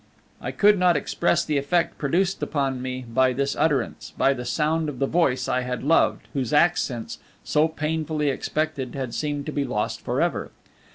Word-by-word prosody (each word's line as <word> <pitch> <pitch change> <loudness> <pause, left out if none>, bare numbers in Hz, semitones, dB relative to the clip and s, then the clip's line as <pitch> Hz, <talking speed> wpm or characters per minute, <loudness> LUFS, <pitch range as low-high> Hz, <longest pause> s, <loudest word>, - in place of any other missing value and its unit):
I - - -3
cannot 180 -5 +4
express 170 +3 +1
the 150 -2 +1
effect 165 +5 0
produced 180 +7 0
upon 135 -4 -1
me 130 0 -4
by 130 +2 +2
this 140 +2 -1
utterance, 145 -5 -1
by 135 - +4
the 125 -2 -6
sound 155 +5 0
of 140 - -7
the 135 - +1
voice 135 -5 +1
I 130 - +1
had 125 -1 -4
loved, 160 +4 +2
whose 130 -4 -2
accents, 150 -7 +1 0.2
so 150 +1 +2
painfully 155 -1 -1
expected, 140 -2 -3
had 130 -3 -4
seemed 145 -2 -2
to 155 - -3
be 145 -1 -1
lost 105 -6 -2
for - - -2
ever. - - 0
145 Hz, 175 wpm, -24 LUFS, 130-160 Hz, 0.2 s, cannot